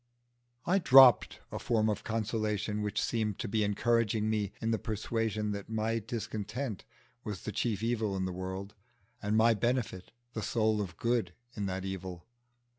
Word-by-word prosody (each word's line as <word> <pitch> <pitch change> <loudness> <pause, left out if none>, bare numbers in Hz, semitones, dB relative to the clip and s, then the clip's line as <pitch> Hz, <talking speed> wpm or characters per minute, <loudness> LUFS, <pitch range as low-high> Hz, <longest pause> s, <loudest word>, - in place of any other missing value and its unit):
I 190 +3 +3
dropped 130 -5 +7
a - - -4
form 110 -3 +1
of 105 0 -1
consolation 110 -1 -1
which 105 -1 -1
seemed 110 -4 -1
to - - -3
be 105 +1 +1
encouraging 110 +1 +1
me 105 -2 -1
in 115 0 -1
the 110 - +1
persuasion 110 0 -2
that 100 0 -5
my 110 +1 0
discontent 110 0 -4 0.4
was 105 -4 -5
the - - -3
chief 110 -2 -1
evil 110 -4 0
in 95 - -1
the 95 - -3
world, 95 +2 -5 0.5
and 105 +1 +1
my 115 +1 +6
benefit 115 -4 -1 0.2
the 110 - -3
soul 110 0 +1
of 90 -5 -6
good 115 -7 0 0.2
in 100 -4 -3
that 95 0 -3
evil. 95 -2 -6
110 Hz, 165 wpm, -31 LUFS, 100-115 Hz, 0.5 s, dropped